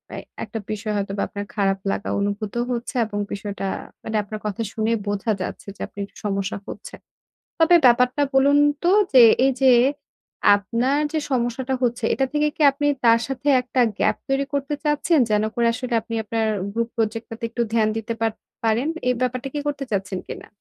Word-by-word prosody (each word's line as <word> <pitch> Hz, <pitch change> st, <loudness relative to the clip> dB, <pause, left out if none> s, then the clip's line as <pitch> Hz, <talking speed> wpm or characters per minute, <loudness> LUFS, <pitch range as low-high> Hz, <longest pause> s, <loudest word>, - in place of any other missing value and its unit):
I -, -, -5 dB, 0.2 s
একটা 220 Hz, +1 st, -5 dB
বিষয় 215 Hz, 0 st, -3 dB
হয়তো 200 Hz, -1 st, -2 dB
বা -, -, 0 dB
আপনার 205 Hz, 0 st, -6 dB
খারাপ 195 Hz, -1 st, +1 dB
লাগা -, -, -3 dB
অনুভূত 205 Hz, +1 st, -2 dB, 0.2 s
হচ্ছে। 240 Hz, +3 st, -4 dB
এবং 205 Hz, -1 st, -4 dB
বিষয়টা 200 Hz, -1 st, -5 dB, 0.4 s
মানে 220 Hz, -, -4 dB
আপনার 215 Hz, +1 st, -7 dB
কথা 210 Hz, +1 st, -3 dB
শুনেই 225 Hz, +1 st, 0 dB
বোঝা 205 Hz, +2 st, -1 dB
যাচ্ছে 185 Hz, -, -6 dB
যে -, -, -13 dB
আপনি -, -, -34 dB
একটু -, -, -25 dB
সমস্যা 195 Hz, -1 st, -1 dB
হচ্ছে। 205 Hz, -, -8 dB, 0.6 s
তবে 325 Hz, +2 st, +6 dB
ব্যাপারটা 250 Hz, +3 st, +4 dB
বলুন 280 Hz, +2 st, +5 dB, 0.3 s
তো 350 Hz, -, +3 dB, 0.2 s
যে 255 Hz, -, +9 dB, 0.2 s
এইযে 265 Hz, 0 st, +3 dB, 0.9 s
আপনার 235 Hz, +7 st, 0 dB, 0.2 s
যে 315 Hz, -, +1 dB
সমস্যাটা 250 Hz, +1 st, -1 dB
হচ্ছে, 240 Hz, -1 st, 0 dB
এটা 270 Hz, -, +1 dB
থেকে 300 Hz, 0 st, +2 dB
কি -, -, -6 dB
আপনি 290 Hz, +1 st, -1 dB, 0.2 s
তার 230 Hz, 0 st, +6 dB
সাথে 270 Hz, +1 st, -5 dB
১ 250 Hz, 0 st, 0 dB, 0.2 s
gap -, -, +2 dB
তৈরি 270 Hz, +1 st, +1 dB
করতে 280 Hz, +1 st, -1 dB
চাচ্ছেন? 300 Hz, +2 st, +2 dB
যেন 210 Hz, 0 st, +2 dB
করে 235 Hz, -1 st, +2 dB, 0.3 s
আপনি 230 Hz, -, -9 dB
আপনার 225 Hz, +1 st, -1 dB, 0.3 s
গ্রুপ 230 Hz, +1 st, -1 dB
project 225 Hz, 0 st, -1 dB
টা 225 Hz, -, -6 dB
তে -, -, -16 dB
একটু 240 Hz, +1 st, -3 dB
ধ্যান 220 Hz, -2 st, +3 dB
দিতে 225 Hz, +1 st, -3 dB
পার 225 Hz, -1 st, +2 dB, 0.3 s
পারেন। 230 Hz, +5 st, +1 dB, 0.2 s
এ -, -, +4 dB
ব্যাপারটা 255 Hz, +1 st, -1 dB
কি 295 Hz, -, -2 dB
করতে 285 Hz, -1 st, -2 dB
চাচ্ছেন 190 Hz, -2 st, -2 dB
কিনা? -, -, -8 dB
230 Hz, 185 wpm, -22 LUFS, 210-265 Hz, 0.9 s, যে